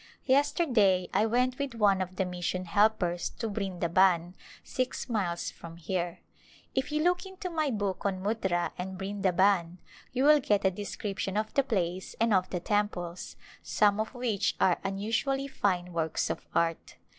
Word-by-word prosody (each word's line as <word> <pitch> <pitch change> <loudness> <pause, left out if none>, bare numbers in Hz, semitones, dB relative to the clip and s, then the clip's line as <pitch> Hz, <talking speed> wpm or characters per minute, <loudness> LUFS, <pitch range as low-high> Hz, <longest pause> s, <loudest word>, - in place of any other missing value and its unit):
Yesterday 255 - +3
I 210 +3 +3
went 250 +3 +1
with 280 -4 -3
one 200 -4 +3
of 185 0 -4
the 190 - 0
mission 180 0 -3
helpers 180 -2 +2
to 230 - -2
Brindaban, 180 -3 +1 0.3
six 255 +1 -3
miles 190 -8 -1
from 165 0 -11
here. 175 +1 -3 0.5
If 265 +3 -1
you 305 +1 +1
look 355 +1 +2
into 380 -1 -7
In - - -10
the 320 - 0
Mountains 295 -3 +1
my - - -2
book 195 -2 -2
on 190 -1 -2
Muttra 190 -5 0
and 190 +1 -4
Brindaban 190 -2 +1 0.3
you 260 +1 0
will 300 +1 +7
get 205 -7 +1
a 190 - +4
de 205 +3 -6
scription 200 -1 -3
of 215 0 -2
the 275 - +4
place 185 -8 -2
and 230 -1 +3
of 185 -1 +2
the 180 - -2
temples, 185 -3 -2 0.3
some 205 0 +2
of 220 +4 -3
which 230 -5 0
are 180 - +3
unusually 225 +8 -1
fine 180 -8 -1
works 160 -1 -1
of - - -6
art. 165 -1 0
200 Hz, 175 wpm, -29 LUFS, 180-235 Hz, 0.5 s, will